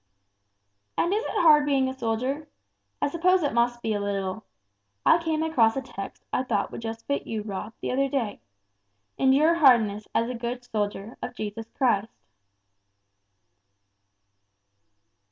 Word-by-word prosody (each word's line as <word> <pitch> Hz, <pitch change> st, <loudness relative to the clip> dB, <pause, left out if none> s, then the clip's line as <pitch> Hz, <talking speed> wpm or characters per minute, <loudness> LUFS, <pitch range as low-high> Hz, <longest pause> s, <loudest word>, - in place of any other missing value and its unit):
"And 345 Hz, -, +2 dB
is 430 Hz, +3 st, 0 dB
it -, -, -1 dB
hard 300 Hz, -3 st, +7 dB
being 275 Hz, -2 st, +2 dB
a 260 Hz, -, -3 dB
soldier? 255 Hz, +5 st, -2 dB, 0.6 s
I -, -, +4 dB
suppose 355 Hz, +4 st, +2 dB
it 285 Hz, -, 0 dB
must 240 Hz, 0 st, +1 dB
be 220 Hz, -, 0 dB
a 205 Hz, -, -1 dB
little. 200 Hz, 0 st, -3 dB, 0.6 s
I 335 Hz, -, +5 dB
came 320 Hz, -1 st, 0 dB
across 240 Hz, -9 st, +3 dB
a 270 Hz, -, -1 dB
text 195 Hz, -5 st, -8 dB
I -, -, +2 dB
thought 225 Hz, -6 st, -1 dB
would -, -, -7 dB
just 225 Hz, 0 st, -6 dB
fit 280 Hz, -, -2 dB
you, 220 Hz, -2 st, -3 dB
Rob, 210 Hz, +1 st, -5 dB
the -, -, -2 dB
other 275 Hz, +2 st, +1 dB
day. 240 Hz, -7 st, -2 dB, 0.8 s
'Endure 275 Hz, +5 st, +5 dB
hardness 230 Hz, -10 st, +4 dB
as 230 Hz, -, +2 dB
a 250 Hz, -, -3 dB
good 240 Hz, +1 st, -4 dB
soldier 210 Hz, -1 st, -3 dB
of 250 Hz, -, -5 dB
Jesus 215 Hz, 0 st, -5 dB
Christ.'" 225 Hz, -4 st, +1 dB
245 Hz, 150 wpm, -26 LUFS, 220-280 Hz, 0.8 s, hard